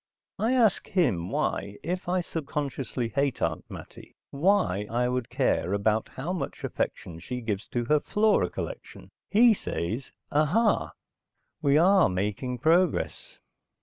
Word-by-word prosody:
I 225 Hz, +5 st, +2 dB
ask 230 Hz, -6 st, +3 dB
him 95 Hz, -, +1 dB
why, 100 Hz, +1 st, -2 dB
if 180 Hz, +2 st, -3 dB
I 180 Hz, 0 st, +2 dB
subconsciously 140 Hz, -7 st, -3 dB
hate 140 Hz, +3 st, 0 dB
Aunt -, -, -2 dB
Mattie, -, -, -11 dB, 0.2 s
why 140 Hz, -, +2 dB
I 120 Hz, +2 st, +1 dB
would 125 Hz, -1 st, -2 dB
care 90 Hz, -, 0 dB
about 105 Hz, +2 st, +1 dB
how 155 Hz, +8 st, -4 dB
much 150 Hz, -7 st, -5 dB
affection 85 Hz, -2 st, -3 dB
she 125 Hz, +9 st, -5 dB
gives 105 Hz, -4 st, -3 dB
to 120 Hz, -1 st, -2 dB
her 150 Hz, +4 st, +3 dB
flora 210 Hz, +6 st, +2 dB
collection. -, -, -7 dB, 0.2 s
He 230 Hz, +2 st, +6 dB
says, 115 Hz, -, -4 dB, 0.2 s
ahah! 170 Hz, +10 st, +2 dB, 0.7 s
We 145 Hz, -1 st, +4 dB
are 185 Hz, +3 st, +5 dB
making 105 Hz, +7 st, -2 dB
progress. 165 Hz, +6 st, +1 dB
140 Hz, 135 wpm, -27 LUFS, 110-180 Hz, 0.7 s, He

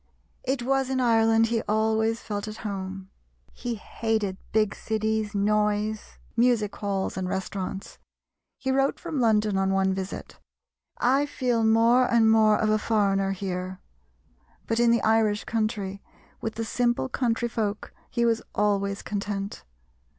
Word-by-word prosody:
It 260 Hz, -1 st, -1 dB
was 270 Hz, +1 st, +1 dB
in 265 Hz, -1 st, 0 dB
Ireland 225 Hz, -2 st, +4 dB
he 230 Hz, -1 st, +1 dB
always 220 Hz, +1 st, +1 dB
felt 205 Hz, 0 st, -4 dB
at 215 Hz, 0 st, -6 dB
home; 190 Hz, -1 st, -5 dB, 0.4 s
he 240 Hz, -1 st, -4 dB
hated 215 Hz, -2 st, -2 dB, 0.2 s
big 215 Hz, -2 st, +2 dB
cities, 220 Hz, -1 st, -2 dB
noise, 210 Hz, +1 st, 0 dB, 0.2 s
music 230 Hz, -4 st, +2 dB
halls, 195 Hz, -2 st, -2 dB
and 185 Hz, -1 st, -2 dB
restaurants. 190 Hz, 0 st, -4 dB, 0.6 s
He 265 Hz, -, -2 dB
wrote 270 Hz, +1 st, +1 dB
from 325 Hz, -5 st, -4 dB
London 215 Hz, -4 st, +2 dB
on 195 Hz, 0 st, +1 dB
one 190 Hz, 0 st, +2 dB
visit, 190 Hz, 0 st, -6 dB, 0.6 s
"I 270 Hz, +4 st, +2 dB
feel 245 Hz, -5 st, 0 dB
more 230 Hz, +3 st, +4 dB
and 225 Hz, -2 st, +5 dB
more 215 Hz, -1 st, +5 dB
of 215 Hz, -1 st, +1 dB
a 215 Hz, -, +3 dB
foreigner 195 Hz, -3 st, +1 dB
here"; 185 Hz, -1 st, -4 dB, 0.9 s
but 225 Hz, 0 st, 0 dB
in 240 Hz, 0 st, +4 dB
the 235 Hz, 0 st, +3 dB
Irish 220 Hz, -2 st, +2 dB
country, 210 Hz, -3 st, -2 dB, 0.4 s
with 225 Hz, -, -3 dB
the 225 Hz, -, -3 dB
simple 240 Hz, +2 st, 0 dB
country 240 Hz, -2 st, 0 dB
folk, 215 Hz, -3 st, -3 dB, 0.2 s
he 235 Hz, -, 0 dB
was 230 Hz, -1 st, +2 dB
always 200 Hz, -1 st, 0 dB
content. 200 Hz, -1 st, -4 dB
220 Hz, 145 wpm, -26 LUFS, 200-230 Hz, 0.9 s, and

